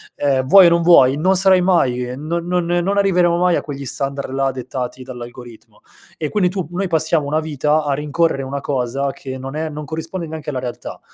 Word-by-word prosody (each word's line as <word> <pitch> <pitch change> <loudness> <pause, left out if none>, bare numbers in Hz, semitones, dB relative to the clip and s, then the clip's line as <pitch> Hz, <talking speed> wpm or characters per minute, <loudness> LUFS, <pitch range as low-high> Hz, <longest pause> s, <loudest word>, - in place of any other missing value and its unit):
Ehm, 135 -2 0
vuoi 190 +4 +8
o - - +6
non 170 0 +2
vuoi, 145 -6 +5
non 185 +5 +2
sarai 190 0 +5
mai 150 -9 +2
ehm, 130 +3 -7
non 170 +1 -2
non 180 -1 0
non 175 +3 0
arriveremo 180 -3 +3
mai 180 0 +2
a - - -2
quegli 140 -2 -7
standard 140 +1 -3
là, 135 0 0
dettati 130 0 -6
dall'algoritmo 120 -2 -11 0.4
e 155 - -3
quindi 200 -4 +1
tu 185 -1 -3
noi 190 +2 -2
passiamo 160 -2 +1
una 155 +2 0
vita 150 0 0
a 145 -1 -1
rincorrere 150 0 0
una 140 +1 -5
cosa 135 0 -2
che 130 -1 -8
non 135 +2 -7
è 160 0 -2
non 150 0 -7
corrisponde 160 +4 -5
neanche 155 -1 -7
alla 130 - -3
realtà. 120 -1 -7
150 Hz, 210 wpm, -19 LUFS, 135-170 Hz, 0.4 s, vuoi